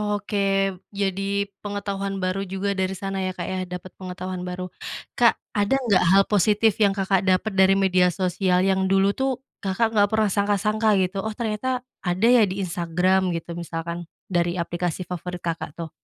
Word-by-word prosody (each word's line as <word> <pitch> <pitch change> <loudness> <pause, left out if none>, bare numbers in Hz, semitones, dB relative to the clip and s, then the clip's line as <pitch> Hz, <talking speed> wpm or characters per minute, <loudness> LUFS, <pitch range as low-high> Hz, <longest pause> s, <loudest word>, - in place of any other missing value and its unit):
Oke 195 -2 0 0.2
jadi 200 0 0 0.2
pengetahuan 200 -1 -3
baru 185 +1 0
juga 195 +2 -2
dari 190 0 -1
sana 195 +1 -3
ya, 185 -1 -2
Kak, 175 - -4
ya? 185 +1 -3
Dapat 180 0 -7
pengetahuan 185 0 -5
baru, 180 0 -5 0.5
Kak, 235 -1 +6 0.2
ada 205 +4 +2
nggak 220 -9 +2
hal 195 - +7
positif 210 +2 +3
yang 200 -2 +4
Kakak 195 -1 +1
dapat 190 +3 +2
dari 190 0 +5
media 185 -2 +4
sosial 180 +1 +1
yang 190 0 +2
dulu 195 +1 +4
itu 265 +4 -1 0.3
Kakak 220 +4 0
nggak 205 -2 +4
pernah 220 -1 +3
sangka-sangka 210 +2 +1
gitu 190 +2 -2
oh 220 - -2
ternyata 235 +3 -2 0.2
ada 180 +5 +2
ya 245 -3 +6
di 195 0 -3
Instagram 180 +1 +1
gitu 170 0 -5
misalkan 170 0 -5 0.2
dari 175 -1 +1
aplikasi 175 +1 -3
favorit 180 0 -5
Kakak 165 -3 -4
tuh. 165 -1 -5
190 Hz, 170 wpm, -24 LUFS, 180-205 Hz, 0.5 s, hal